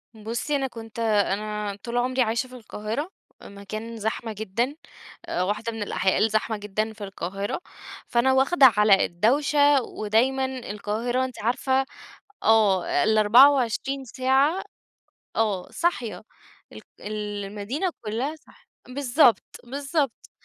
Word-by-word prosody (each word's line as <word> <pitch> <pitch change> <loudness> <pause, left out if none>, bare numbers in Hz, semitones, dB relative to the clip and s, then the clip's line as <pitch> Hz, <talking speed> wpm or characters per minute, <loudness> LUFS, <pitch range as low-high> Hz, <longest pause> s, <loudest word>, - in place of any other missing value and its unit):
بُصّي، 230 +7 -3
أنا 270 -1 0
كنت 230 -2 -10
أنا 210 -1 0
طول 240 0 -3
عمري 255 +1 +1
عايشة 235 +2 0
في 255 - -13
القاهرة، 230 - -5 0.3
مكان 215 +3 -7
زحمة 220 +1 -3
جدًا 220 +6 -2 0.5
آآ، 180 - -1
واحدة 210 +4 -2
من 225 -2 -4
الأحياء 190 -2 0
الزحمة 215 0 +1
جدًا 210 +2 -3
في 215 -1 -10
القاهرة، 195 +1 -4 0.5
فأنا 245 +2 +2
واخدة 270 +3 +5
على 210 -2 +5
الدوشة، 285 +8 +3
ودايمًا 245 +5 0
القاهرة 240 0 -2
أنتِ 255 - -8
عارفة 260 +3 +1 0.6
آه، 205 -9 +3
ال24 250 +4 +4
ساعة 270 +8 +1 0.7
آه، 205 -5 0
صاحية 235 - -2 0.5
الق - - -11 0.2
المدينة 210 - -3 0.2
كلّها 240 +8 -2
صاحية 310 - -22 0.2
بالضبط، 250 -3 +3 0.2
بالضبط 280 +1 -2
230 Hz, 115 wpm, -25 LUFS, 210-265 Hz, 0.7 s, واخدة